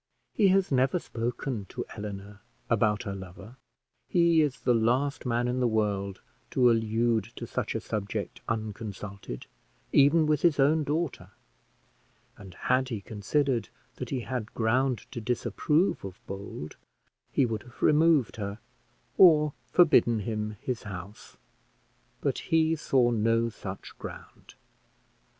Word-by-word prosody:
He 205 Hz, -, +4 dB
has 190 Hz, -2 st, +3 dB
never 135 Hz, +5 st, +3 dB
spoken 120 Hz, -, -3 dB
to -, -, -6 dB
Eleanor 105 Hz, 0 st, -7 dB, 0.3 s
about 105 Hz, -2 st, +2 dB
her 100 Hz, -4 st, -4 dB
lover; 95 Hz, +5 st, -10 dB, 0.5 s
he 170 Hz, -2 st, +4 dB
is 145 Hz, -4 st, -1 dB
the 125 Hz, -, +3 dB
last 125 Hz, +5 st, +1 dB
man 120 Hz, 0 st, +1 dB
in 125 Hz, +1 st, -1 dB
the 125 Hz, -, +3 dB
world 100 Hz, -3 st, -1 dB, 0.3 s
to 125 Hz, -2 st, +4 dB
allude 115 Hz, -1 st, +1 dB
to -, -, -6 dB
such -, -, -3 dB
a -, -, 0 dB
subject 100 Hz, -2 st, -4 dB
unconsulted, 105 Hz, -, -5 dB, 0.5 s
even 145 Hz, +3 st, +5 dB
with 150 Hz, -1 st, +1 dB
his 165 Hz, -4 st, +3 dB
own 150 Hz, +3 st, +4 dB
daughter; 150 Hz, +1 st, -2 dB, 1.1 s
and 95 Hz, -3 st, -12 dB
had 130 Hz, +5 st, +1 dB
he 115 Hz, -4 st, -3 dB
considered 115 Hz, +4 st, -1 dB, 0.3 s
that -, -, -5 dB
he 130 Hz, -3 st, -2 dB
had 120 Hz, -2 st, -5 dB
ground 120 Hz, +1 st, +1 dB
to 120 Hz, -, -5 dB
disapprove 150 Hz, -, 0 dB
of 95 Hz, -2 st, -8 dB
Bold, 95 Hz, -6 st, -7 dB, 0.5 s
he 135 Hz, -, +3 dB
would 110 Hz, -3 st, -3 dB
have 120 Hz, +2 st, -17 dB
removed 155 Hz, -6 st, +4 dB
her, 100 Hz, -1 st, -4 dB, 0.6 s
or 150 Hz, -5 st, +7 dB, 0.2 s
forbidden 120 Hz, -10 st, +5 dB
him 105 Hz, 0 st, -3 dB
his 125 Hz, -3 st, -3 dB
house; 100 Hz, 0 st, -9 dB, 0.8 s
but -, -, 0 dB
he 160 Hz, 0 st, +2 dB
saw 130 Hz, -5 st, +2 dB
no 115 Hz, +1 st, +2 dB
such 95 Hz, -3 st, -8 dB
ground. -, -, -10 dB
115 Hz, 135 wpm, -28 LUFS, 105-140 Hz, 1.1 s, or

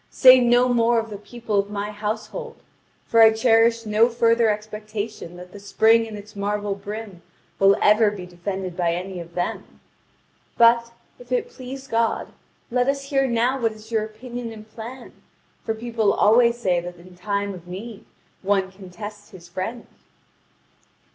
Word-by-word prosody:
Say 255 Hz, 0 st, +7 dB
no 245 Hz, 0 st, +4 dB
more 235 Hz, -1 st, +3 dB
of 225 Hz, -1 st, -2 dB
the 205 Hz, -, -5 dB
people 220 Hz, -1 st, -3 dB
of 200 Hz, 0 st, -1 dB
my 205 Hz, 0 st, -4 dB
household; 220 Hz, -, -5 dB, 0.5 s
for 230 Hz, -, +4 dB
I 220 Hz, 0 st, +9 dB
cherish 230 Hz, 0 st, +3 dB
no 215 Hz, +2 st, +3 dB
further 230 Hz, -1 st, +3 dB
expectation 210 Hz, -3 st, -5 dB
that 180 Hz, 0 st, -11 dB
the 205 Hz, -, -11 dB
spring 225 Hz, +3 st, +3 dB
and 215 Hz, -1 st, -7 dB
its 210 Hz, +1 st, -12 dB
marble 205 Hz, 0 st, -2 dB
brim 200 Hz, -1 st, -8 dB, 0.4 s
will 195 Hz, 0 st, +5 dB
ever 210 Hz, +1 st, +5 dB
be 200 Hz, -3 st, -7 dB
defended 180 Hz, +1 st, -5 dB
by 170 Hz, -2 st, 0 dB
any 185 Hz, +1 st, -5 dB
of 170 Hz, 0 st, -10 dB
them. 175 Hz, 0 st, -4 dB, 0.8 s
But, 235 Hz, 0 st, +5 dB, 0.3 s
if -, -, -15 dB
it 485 Hz, -1 st, -1 dB
please 265 Hz, -, -8 dB
God, 230 Hz, -1 st, 0 dB, 0.4 s
let 250 Hz, +1 st, +1 dB
us 275 Hz, 0 st, -2 dB
hear 270 Hz, -1 st, +2 dB
now 245 Hz, +2 st, +1 dB
what 225 Hz, -1 st, +1 dB
is 215 Hz, +1 st, -15 dB
your 220 Hz, -2 st, +1 dB
opinion 235 Hz, +2 st, -7 dB
and 215 Hz, -1 st, -11 dB
plan; 235 Hz, +3 st, -10 dB, 0.5 s
for 225 Hz, -, -2 dB
people 230 Hz, -2 st, 0 dB
always 235 Hz, +2 st, +4 dB
say 185 Hz, -7 st, +1 dB
that 175 Hz, 0 st, -8 dB
in 180 Hz, +1 st, -15 dB
time 200 Hz, +2 st, -2 dB
of 175 Hz, -2 st, -12 dB
need 200 Hz, +4 st, -8 dB, 0.4 s
one 195 Hz, -1 st, 0 dB
can 190 Hz, -1 st, -13 dB
test 205 Hz, +2 st, -9 dB
his 180 Hz, -4 st, -13 dB
friend." 190 Hz, +7 st, -5 dB
215 Hz, 165 wpm, -23 LUFS, 200-235 Hz, 0.8 s, I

